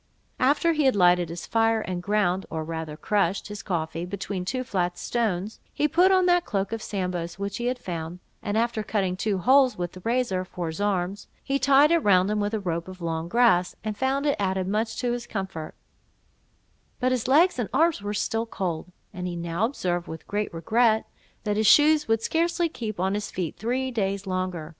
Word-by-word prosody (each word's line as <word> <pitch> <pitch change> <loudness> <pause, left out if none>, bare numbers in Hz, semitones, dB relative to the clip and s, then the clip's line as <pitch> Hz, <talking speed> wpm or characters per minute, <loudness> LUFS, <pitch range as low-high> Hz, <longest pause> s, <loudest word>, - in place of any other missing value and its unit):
After 290 +6 +3
he 305 -2 +1
had 265 - +4
lighted 175 -2 +4
his 170 +1 -6
fire, 225 -1 +2
and 180 -3 -4
ground, 195 -1 0
or 160 -1 -3
rather 160 -1 -5
crushed, 195 +1 0
his 210 -1 -6
coffee, 165 -2 -3
between 190 0 -4
two 255 +6 -2
flat 180 -6 -1
stones, 215 -3 -2
he 300 - +1
put 355 +5 +4
on 370 -1 +4
that 355 -1 +4
cloak 195 - -2
of 225 -1 -3
Sambo's 180 -5 -3
which 200 0 -4
he 240 - -3
had 250 +1 0
found; 170 -5 -5 0.2
and 205 +1 -2
after 230 -1 0
cutting 195 -3 -1
two 200 +1 -1
holes 260 +6 +4
with 175 -1 -3
the 185 - -11
razor, 230 -3 0
for 180 -1 -6
his 160 +4 -4
arms, 195 -1 -1 0.2
he 275 0 0
tied 280 +3 +5
it 335 - +5
round 195 - +3
him, 210 - 0
with 205 +2 -1
a - - -1
rope 170 -3 -3
of 185 0 -10
long 165 -1 -3
grass, 200 -6 +3
and 215 -1 -3
found 270 +4 0
it 285 - +2
added 190 -2 0
much 220 +3 -1
to 245 -1 0
his 240 0 -4
comfort; 190 -5 -5 1.2
but 255 0 +1
his 255 -1 -1
legs 310 +3 +4
and 230 - -1
arms 330 -7 +2
were 205 0 -3
still 225 +2 -1
cold; 180 -5 -4 0.2
and 180 -1 -4
he 175 - -4
now 170 +4 -1
observed, 175 -9 -2
with 160 - -8
great 210 +1 -2
regret, 220 +6 +2 0.4
that 210 -1 -1
his 215 0 +2
shoes 300 0 +6
would 225 0 +1
scarcely 340 +1 +1
keep 220 - -6
on 190 +2 +1
his 210 0 -3
feet 175 -4 -4
three 255 +4 -2
days 200 -3 -1
longer. 185 -4 -3
205 Hz, 205 wpm, -25 LUFS, 180-245 Hz, 1.2 s, shoes